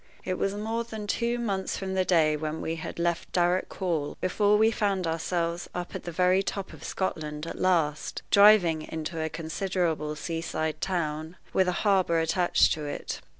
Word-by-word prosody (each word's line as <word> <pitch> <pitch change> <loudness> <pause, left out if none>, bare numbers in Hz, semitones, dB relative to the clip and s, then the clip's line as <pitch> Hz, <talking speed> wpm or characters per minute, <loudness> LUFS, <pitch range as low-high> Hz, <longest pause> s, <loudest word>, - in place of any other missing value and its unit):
It 185 -1 -2
was 195 +1 0
more 225 +3 -2
than 220 -2 -7
two 235 +3 0
months 195 -5 -2
from 190 -1 -4
the 190 0 +2
day 160 -4 +3
when 155 +1 -3
we 165 +1 -3
had 160 - -6
left 170 0 -1
Darrock 180 +1 +2
Hall 165 -6 -2
before 205 +3 +3
we 220 +1 +4
found 200 -4 0
ourselves 170 +1 -2
up 180 0 -4
at - - -6
the 175 - -4
very 180 +3 +3
top 195 0 -4
of - - -12
Scotland 155 -5 -3
at - - -6
last, 165 -5 0
driving 200 -6 +6
into 160 +1 -5
a 160 - -1
considerable 160 -1 -2
sea 165 +2 -4
side 155 -1 -3
town, 160 -2 -2 0.2
with 190 - +3
a - - +3
harbor 190 -5 +3
attached 175 +2 +3
to 155 -2 -5
it. 145 - -5
175 Hz, 185 wpm, -27 LUFS, 160-195 Hz, 0.2 s, driving